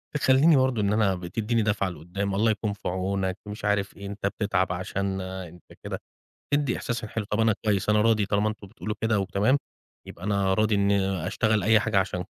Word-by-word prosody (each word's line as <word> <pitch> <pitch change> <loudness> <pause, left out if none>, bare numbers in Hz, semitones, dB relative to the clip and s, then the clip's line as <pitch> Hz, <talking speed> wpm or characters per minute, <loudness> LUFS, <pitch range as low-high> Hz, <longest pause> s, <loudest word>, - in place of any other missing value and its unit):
تخلّيني 145 +3 +5
برضو 130 -4 +2
إن 100 +1 +1
أنا 105 -3 +2
بتيديني 105 +6 -1
دافعة 105 -2 0
لقدّام: 90 +4 -4
"الله 110 +2 +3
يكون 105 -1 -2
في 100 - -7
عونك،" 95 +1 -1
ومش 105 +1 -7
عارف 100 -1 0
إيه، 100 - -8
"أنت 100 0 -3
بتتعب 100 -3 0
عشانا، 95 0 -3
أنت 90 +1 -15 0.2
كده" - - -4 0.6
تدي 145 -4 +1
إحساس 120 0 -3
ليّا 105 - -9
حلو 115 -2 -2
"طب 105 - +1
أنا 110 -1 +4
كويس، 100 -3 +1
أنا 105 0 +4
راضي 110 -2 +3
طالما 105 +1 +1
أنتم 105 -1 -6
بتقولوا 105 +1 -5
كده 110 -2 +2
وتمام، 100 +8 +2 0.5
يبقى 90 - -10
أنا 100 -2 +1
راضي 110 +1 +2
إني 95 -3 +1
أشتغل 110 0 +1
أي 110 +2 +5
حاجة 110 -4 +1
عشان" 90 -1 -1
100 Hz, 200 wpm, -26 LUFS, 95-110 Hz, 0.6 s, تخلّيني